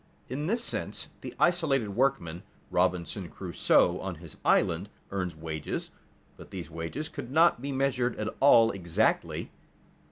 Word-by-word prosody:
_ - - -35 0.3
In 145 +5 -3
this 230 +4 0
sense - - -3
the - - -7
isolated 155 -10 +2
workman, 100 -8 0 0.3
Robinson 90 0 0
Crusoe 90 +1 +2
on 95 -2 -4
his 80 -1 -12
island, - - +2 0.2
earns 90 -4 -2
wages, 80 -1 -4 0.5
but - - -12
these 90 -3 -7
wages 85 - -4
could 145 -6 -7
not 160 -2 +4
be 140 +1 -3
measured 130 -3 +1
at 110 0 -2
all 115 -5 +7
exactly. 85 -4 0
105 Hz, 140 wpm, -29 LUFS, 85-135 Hz, 0.5 s, all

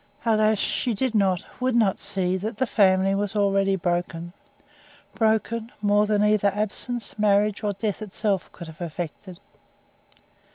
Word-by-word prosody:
Alas! 215 -1 +3
she 230 +3 -1
did 255 +2 -1
not, 190 -5 +1
would 255 -1 0
not 215 -5 +2
see 185 -1 -1
that 210 +4 -4
the 260 - +1
family 195 -4 +3
was 205 +1 -2
already 195 -1 +2
"broken." 175 -1 -2 0.8
Broken, 225 +1 0
more 205 0 +3
than 210 -1 +2
either 210 -1 +3
absence, 220 +3 -4
marriage, 210 0 +2
or 205 -1 0
death 205 +2 -3
itself 205 -2 -2
could 170 - -10
have 160 +1 -12
effected. 175 +2 -6
205 Hz, 140 wpm, -24 LUFS, 190-215 Hz, 0.8 s, Alas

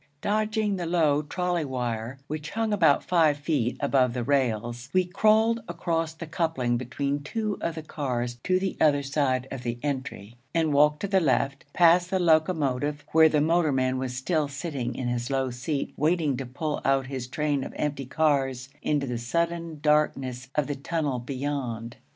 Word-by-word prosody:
Dodging 215 0 0
the 175 -2 -3
low 155 -4 +3
trolley 175 +2 -1
wire 125 -2 -3
which 150 +1 -5
hung 225 -1 -1
about 165 -8 +4
five 160 -5 +3
feet 145 -5 -1
above 130 -3 +2
the 125 - -1
rails, 120 -2 0
we 185 -1 +3
crawled 220 +5 +3
across 165 -2 -2
the 170 - -7
coupling 155 -7 0
between 140 +4 -2
two 210 +7 -3
of 170 - -2
the 160 - -6
cars 125 -6 -3
to 185 - +3
the 190 0 -2
other 145 -2 +4
side 135 -2 0
of 135 - -5
the 120 -1 -3
entry, 130 -6 -4 0.2
and 160 -3 +2
walked 150 +1 +4
to 200 - -1
the 190 -1 +3
left, 140 -3 0
past 175 +2 +5
the 190 - +1
locomotive 155 -4 +1
where 160 0 +7
the 150 -1 +2
motorman 145 -6 +2
was 130 -1 -3
still 150 +3 0
sitting 140 -3 -4
in 130 - -3
his 120 0 -2
low 135 -2 0
seat, 135 +4 -3
waiting 155 -2 +2
to 130 0 -5
pull 150 +4 -3
out 135 -1 +2
his 130 -2 -5
train 145 +1 -1
of - - -6
empty 145 -3 -2
cars 135 -3 +1
into 145 -2 0
the 125 -3 -3
sudden 170 +5 -2
darkness 135 -4 +1
of 150 - +2
the 145 - -2
tunnel 145 -2 -2
beyond. 125 -3 -4
145 Hz, 175 wpm, -26 LUFS, 130-165 Hz, 0.2 s, where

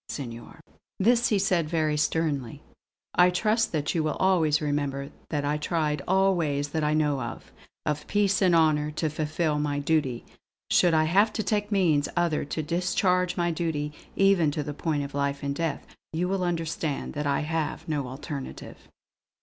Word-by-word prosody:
Senor" 120 +3 -7 0.4
this 235 +4 +4
he 210 - +2
said 180 -5 +1
very 155 -2 +1
sternly 150 -5 -1 0.5
"I 180 0 +6
trust 220 +5 +1
that 150 -2 -1
you 165 - +1
will 155 -1 -1
always 165 -5 +3
remember 145 -2 -2 0.2
that 145 -2 -1
I 150 +1 0
tried 150 -2 -1
all 190 +1 +4
ways 145 -4 -1
that 155 +1 -2
I 150 0 +2
know 150 -3 +1
of, - - -7 0.3
of 150 -1 -2
peace 205 0 +2
and 180 -3 +4
honour, 155 -2 +3
to 150 0 -2
fulfill 155 0 -1
my 145 -1 -1
duty. 145 -4 0 0.5
Should 175 -2 +4
I 155 - +4
have 200 +7 +3
to 215 - -1
take 205 +1 -1
means 165 -8 +2
other 170 -3 +1
to 155 +2 -3
discharge 180 +2 +1
my 175 -1 +1
duty, 155 -3 -2 0.2
even 195 -5 +4
to 150 0 -2
the 150 - -5
point 150 -1 -1
of 140 - -7
life 140 0 -1
and 140 0 -1
death, 160 0 -3 0.3
you 175 +3 0
will 190 0 -1
understand 165 -4 -2
that 145 0 -2
I 140 +1 +1
have 160 0 -3
no 145 -4 -1
alternative." 135 +1 -8
155 Hz, 175 wpm, -27 LUFS, 145-180 Hz, 0.5 s, I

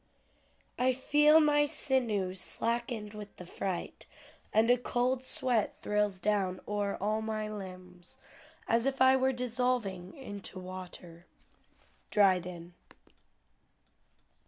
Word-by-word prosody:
"I 255 +1 +3
feel 295 +4 +5
my 295 -1 +4
sinews 220 - 0
slackened 230 -2 -2
with 210 -1 -9
the 180 - -9
fright, 180 0 -5 0.4
And 225 +2 +4
a 245 - +5
cold 245 +1 0
sweat 255 -3 0
thrills 210 -2 +1
down 190 -1 0
o'er 205 -1 -1
all 215 +2 0
my 215 -1 -3
limbs 185 -4 -9 0.5
As 230 +3 +2
if 270 -1 -1
I 260 0 +6
were 265 0 +2
dissolving 245 -7 -1
into 205 -7 -7
water." 180 -2 -9 0.8
DRYDEN. 180 -4 +1
210 Hz, 110 wpm, -31 LUFS, 185-250 Hz, 0.8 s, I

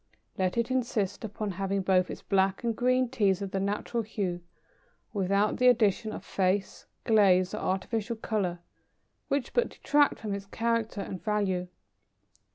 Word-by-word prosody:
Let 185 +3 -1
it 235 +2 0
insist 230 -7 -1
upon 210 -1 -4
having 195 +1 -1
both 185 -1 +3
its - - -7
black 195 +1 +1
and 230 -1 0
green 255 +2 +2
Teas 205 -7 +1
of 195 - -5
the 195 - -1
natural 205 +4 -1
hue, 195 -5 -3 0.7
without 200 +1 +1
the 250 - +4
addition 220 -2 +3
of - - -7
"face," 190 +1 -1 0.2
"glaze," 190 -5 +4
or - - -3
artificial 220 +4 -2
colour, 195 -6 -2 0.7
which 275 -3 -1
but 485 - +2
detract 290 0 +2
from 215 -2 -4
its 200 0 -5
character 230 -1 -1
and 185 - -6
value. 195 -4 0
205 Hz, 155 wpm, -29 LUFS, 190-230 Hz, 0.7 s, the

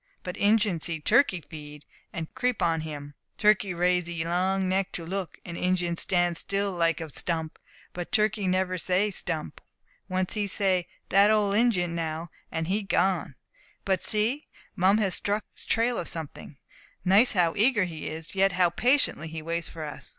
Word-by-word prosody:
But 180 - -5
Injin 205 -5 +2
see 165 0 -4
turkey 210 - +3
feed, 150 -2 -11 0.3
and 160 -1 -6
creep 250 -1 0
on 165 -1 +1
him. 145 -2 -7 0.2
Turkey 210 -2 +3
raise 180 0 +1
'ee 170 -1 -3
long 185 +2 +1
neck 190 +1 0
to 170 - -5
look, 185 -1 -4
and 175 - -6
Injin 180 -1 0
stand 175 -1 +1
still 200 +2 0
like 170 -2 +1
a 165 - -5
stump; 160 +1 -3 0.3
but 175 -1 -6
turkey 210 -2 +1
never 185 0 0
say 190 +4 +1
"stump!" 160 - -4 0.5
once; 185 0 -1
he 210 -2 -1
say, 185 -3 0 0.2
"dat 200 +2 +5
old 210 -2 +3
Injin 200 -7 +2
now!" 165 0 -4 0.2
and 160 0 -2
he 195 +5 0
gone.' 190 -1 0 0.5
But 190 -3 +1
see, 225 +8 +1 0.3
Mum 190 +3 +4
has 195 -4 +1
struck 205 +3 -1
the - - -10
trail 235 +2 +1
of 170 - -4
something. 155 -2 -6 0.5
Notice 200 +7 +5
how 175 -4 +2
eager 220 -1 +4
he 165 -4 -5
is, 160 +1 -7
yet 195 -1 +3
how 180 -1 +3
patiently 245 - +2
he 160 0 -7
waits 170 +1 -2
for 160 - -7
us. 150 -1 -7
180 Hz, 175 wpm, -27 LUFS, 165-200 Hz, 0.5 s, dat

